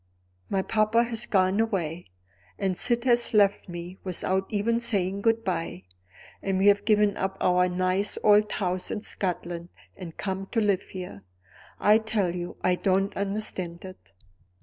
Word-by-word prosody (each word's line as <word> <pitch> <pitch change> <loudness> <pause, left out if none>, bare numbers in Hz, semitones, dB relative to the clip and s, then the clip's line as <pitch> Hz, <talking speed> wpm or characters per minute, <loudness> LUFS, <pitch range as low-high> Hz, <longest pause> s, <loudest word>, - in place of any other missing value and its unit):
My 195 -1 0
papa 215 +3 +2
has 235 0 -2
gone 190 0 +2
away 180 -7 -2 0.5
and 190 -2 -1
Syd 235 +5 +1
has 240 -2 +3
left 200 -2 +3
me 175 +2 -8
without 190 +1 0
even 225 +3 0
saying 200 -4 0
good 225 +1 +2
by, 165 - -3 0.6
and 195 -1 -1
we 190 - +1
have 205 0 +2
given 210 -2 +3
up 195 0 -2
our 180 0 +3
nice 185 +3 0
old 210 0 +5
house 180 -2 -2
in 210 - -4
Scotland 175 -3 -3 0.3
and 175 -4 -10
come 195 0 -4
to 230 - +2
live 200 -3 +2
here. 180 - -9 0.6
I 210 +1 +5
tell 210 -5 -1
you 175 0 -6
I 180 - +3
don't 195 +2 0
understand 195 -4 -1
it. 185 - -12
195 Hz, 155 wpm, -26 LUFS, 180-210 Hz, 0.6 s, old